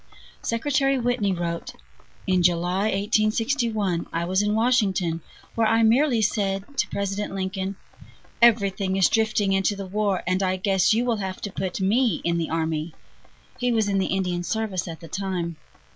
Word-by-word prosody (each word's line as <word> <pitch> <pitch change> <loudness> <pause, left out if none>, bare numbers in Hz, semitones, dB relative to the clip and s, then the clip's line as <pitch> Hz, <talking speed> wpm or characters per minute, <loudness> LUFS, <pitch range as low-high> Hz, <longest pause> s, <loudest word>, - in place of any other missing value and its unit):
Secretary 275 +3 +1
Whitney 245 -5 0
wrote: 170 -2 -3 0.5
"In 185 -1 +2
July, 175 +3 +1
1861, 215 -1 0
I 170 +1 -1
was 190 +2 +1
in 210 0 0
Washington, 195 -8 +1 0.3
where 225 -1 +2
I 225 +1 +3
merely 235 +1 +3
said 195 -2 0 0.2
to - - +2
President 200 0 -3
Lincoln: 190 0 -3 0.7
'Everything 200 -4 +3
is 190 - +5
drifting 215 -3 +1
into 195 +2 +1
the 195 0 -6
war, 200 0 -1
and 185 +1 0
I 185 -1 +1
guess 190 0 +2
you 235 +2 +1
will 235 -3 +1
have 190 -2 -4
to 205 - -4
put 190 -1 -3
me 215 +1 +2
in 170 0 0
the 165 - -2
army.' 160 0 -2 0.6
(He 245 -1 +1
was 220 -3 +2
in 195 -1 +1
the 190 - 0
Indian 180 -2 -1
service 200 -1 -2
at 165 0 -7
the 165 - -9
time.) 175 -2 -3
195 Hz, 165 wpm, -24 LUFS, 185-220 Hz, 0.7 s, is